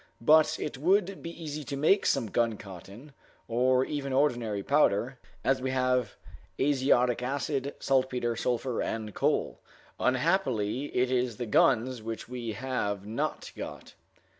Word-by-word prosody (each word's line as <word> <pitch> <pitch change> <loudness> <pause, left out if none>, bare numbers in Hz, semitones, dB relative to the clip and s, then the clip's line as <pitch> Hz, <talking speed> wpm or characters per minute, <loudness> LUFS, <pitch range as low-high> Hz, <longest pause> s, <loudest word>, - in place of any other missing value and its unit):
But 155 +6 +4
it 140 - -4
would 190 +4 +2
be 165 - -6
easy 155 -3 -6
to 140 0 -4
make 160 +8 +3
some 120 -7 +1
guncotton, 105 - -4 0.3
or 125 +2 +2
even 140 -2 -4
ordinary 120 -7 +1
powder, 130 -2 +2 0.2
as 135 -1 +2
we 130 - -1
have 125 -3 0 0.4
azotic 130 -3 +2
acid, 140 +1 -2
saltpeter, 130 -3 0
sulphur, 125 +1 -1
and 110 -2 -3
coal. - - 0 0.4
Unhappily, 130 - +1
it 125 -2 0
is 125 -3 0
the 120 - -3
guns 115 +3 +2
which 115 0 -6
we 120 -2 -5
have 105 -5 -3
not 110 +2 -3
got. - - -8
130 Hz, 135 wpm, -29 LUFS, 115-140 Hz, 0.4 s, But